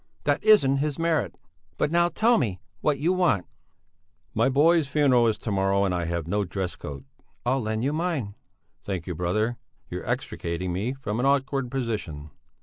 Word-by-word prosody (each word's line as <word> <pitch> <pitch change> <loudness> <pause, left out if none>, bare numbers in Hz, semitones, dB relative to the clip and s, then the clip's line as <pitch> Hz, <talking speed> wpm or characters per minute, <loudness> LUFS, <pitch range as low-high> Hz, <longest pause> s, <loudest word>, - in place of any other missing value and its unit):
"That 145 - +1
isn't 205 -11 +5
his 145 0 -1
merit! 165 -1 0 0.4
But 150 - 0
now 170 0 +3
tell 225 +7 +3
me 100 - -1 0.2
what 145 +6 +1
you 170 +5 +1
want." 175 - +2 0.9
"My 115 +4 +3
boy's 155 +3 +4
funeral 135 -5 +4
is 110 -2 +1
to 110 - -4
morrow, 100 0 +2
and 95 -2 +1
I 85 -1 -1
have 85 -1 -2
no 100 +5 0
dress 95 -1 -3
coat...." 70 -1 -8 0.4
"I'll 130 +2 +1
lend 110 0 -2
you 140 +3 0
mine." 155 - -2 0.5
"Thank 95 -4 -4
you, 90 - -3
brother. 110 +8 -1 0.3
You're - - -5
extricating 85 +1 -2
me 105 +8 -1
from 115 -4 -4
an 130 - +2
awkward 135 -2 +1
position. 105 - -4
120 Hz, 175 wpm, -26 LUFS, 95-145 Hz, 0.9 s, isn't